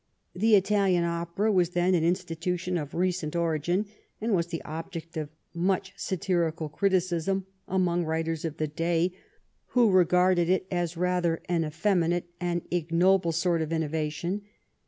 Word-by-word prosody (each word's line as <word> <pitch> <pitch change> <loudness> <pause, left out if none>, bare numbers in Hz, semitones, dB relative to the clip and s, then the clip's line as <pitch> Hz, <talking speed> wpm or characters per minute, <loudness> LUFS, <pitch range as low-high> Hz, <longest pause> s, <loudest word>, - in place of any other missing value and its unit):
The 215 +4 +4
Italian 195 -3 +3
opera 170 +5 0
was 180 -4 +3
then 175 +1 +1
an 170 -3 +2
institution 180 +1 -1
of 150 -4 -3
recent 175 -3 -1
origin, 170 +3 0 0.3
and 225 0 -1
was 170 -3 +1
the 170 -2 -5
object 165 +1 -7
of 155 -2 -3 0.2
much 185 +2 0
satirical 170 -5 -1
criticism 185 +1 0 0.2
among 175 -2 +1
writers 160 0 -2
of 160 -2 -4
the 155 - 0
day 170 +3 0 0.6
who 235 -4 +6
regarded 180 -1 +4
it 185 0 +2
as 175 -2 -1
rather 180 -2 0
an 170 -2 +1
effeminate 170 +2 +1
and 175 -1 -1
ignoble 175 +1 +2
sort 170 0 +1
of 160 0 -3
innovation. 160 +4 -2
175 Hz, 140 wpm, -27 LUFS, 165-185 Hz, 0.6 s, who